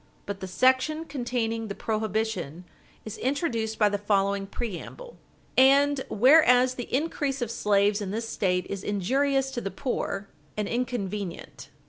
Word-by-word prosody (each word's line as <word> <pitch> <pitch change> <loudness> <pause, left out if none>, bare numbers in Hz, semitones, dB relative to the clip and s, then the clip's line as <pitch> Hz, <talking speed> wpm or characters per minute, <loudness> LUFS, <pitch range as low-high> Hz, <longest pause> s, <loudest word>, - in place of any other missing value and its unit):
But 200 -1 -5
the 190 - -5
section 260 - +2
containing 240 -5 -2
the 200 - -5
prohibition 215 -7 -2 0.4
is 215 0 -7
introduced 235 -5 -1
by 210 - +4
the 205 0 -1
following 200 -1 +1
preamble: 240 - -7 0.4
"And 275 +1 +5
whereas 255 +1 +5
the 245 -2 -7
increase 280 -1 -1
of 240 -3 -2
slaves 205 -1 +2
in 200 - -3
this 225 +3 -3
State 180 -4 0
is 200 -1 -5
injurious 270 +7 0
to 245 -3 -4
the 195 - -3
poor, 200 -3 -3 0.3
and 210 -1 -1
inconvenient." 210 -7 -4
225 Hz, 140 wpm, -26 LUFS, 200-260 Hz, 0.4 s, And